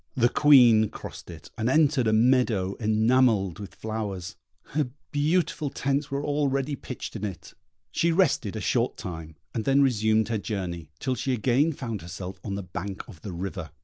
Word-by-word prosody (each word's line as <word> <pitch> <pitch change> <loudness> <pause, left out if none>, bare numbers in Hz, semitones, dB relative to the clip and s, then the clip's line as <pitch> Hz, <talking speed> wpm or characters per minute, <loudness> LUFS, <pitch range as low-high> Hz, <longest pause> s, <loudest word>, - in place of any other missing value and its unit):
The 120 -1 +4
Queen 120 -7 +6
crossed - - -9
it, - - -11
and 110 +2 +1
entered 145 -4 +3
a - - +3
meadow 110 -4 +3
enamelled 110 -3 +2
with 95 -4 -9
flowers. 105 -6 -4 0.4
Her 145 -3 0 0.2
beautiful 150 +1 +1
tents 140 +1 -1
were 140 +1 -2
already 145 -1 0
pitched 130 -3 -7
in 110 - -5
it. 95 -5 -6 0.4
She 170 - +2
rested 160 - +2
a 110 - -4
short 120 +4 0
time, 80 -6 -7 0.2
and 115 - -2
then 140 +2 +4
resumed 110 -3 +2
her 110 -2 0
journey, 90 -7 -4
till 130 - -1
she 130 +2 -1
again 125 +7 +2
found 115 -8 -5
herself 90 +2 -7
on 100 -2 -3
the 100 - -4
bank 95 +2 -6
of 90 -9 -13
the 100 - -6
river. 90 -1 -5
110 Hz, 175 wpm, -26 LUFS, 100-135 Hz, 0.4 s, Queen